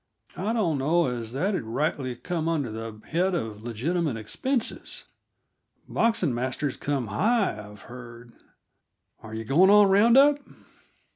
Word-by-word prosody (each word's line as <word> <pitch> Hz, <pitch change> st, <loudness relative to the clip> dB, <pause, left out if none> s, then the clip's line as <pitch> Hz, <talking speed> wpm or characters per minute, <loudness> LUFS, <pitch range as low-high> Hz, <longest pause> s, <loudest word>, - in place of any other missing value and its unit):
I 205 Hz, +4 st, -2 dB
don't 175 Hz, -11 st, 0 dB
know 165 Hz, +6 st, +2 dB
as 120 Hz, -3 st, -4 dB
that'd 185 Hz, +8 st, 0 dB
rightly 130 Hz, +2 st, -2 dB
come 165 Hz, +5 st, -3 dB
under 145 Hz, -8 st, -1 dB
the 110 Hz, -1 st, -7 dB
head 180 Hz, +3 st, +1 dB
of 110 Hz, -8 st, -4 dB
legitimate 130 Hz, +5 st, -2 dB
expenses; 240 Hz, -, -3 dB, 0.8 s
boxing 225 Hz, -, +1 dB
masters 130 Hz, +3 st, -2 dB
come 135 Hz, -6 st, -2 dB
high, 190 Hz, -, 0 dB
I've 105 Hz, -1 st, -14 dB
heard. 120 Hz, -1 st, -11 dB, 0.9 s
Are 110 Hz, 0 st, -9 dB
yuh 110 Hz, -, -4 dB
going 170 Hz, -, +5 dB
on 205 Hz, -1 st, +7 dB
round 225 Hz, +5 st, +5 dB
up?" 285 Hz, +1 st, +6 dB
145 Hz, 135 wpm, -26 LUFS, 115-190 Hz, 0.9 s, on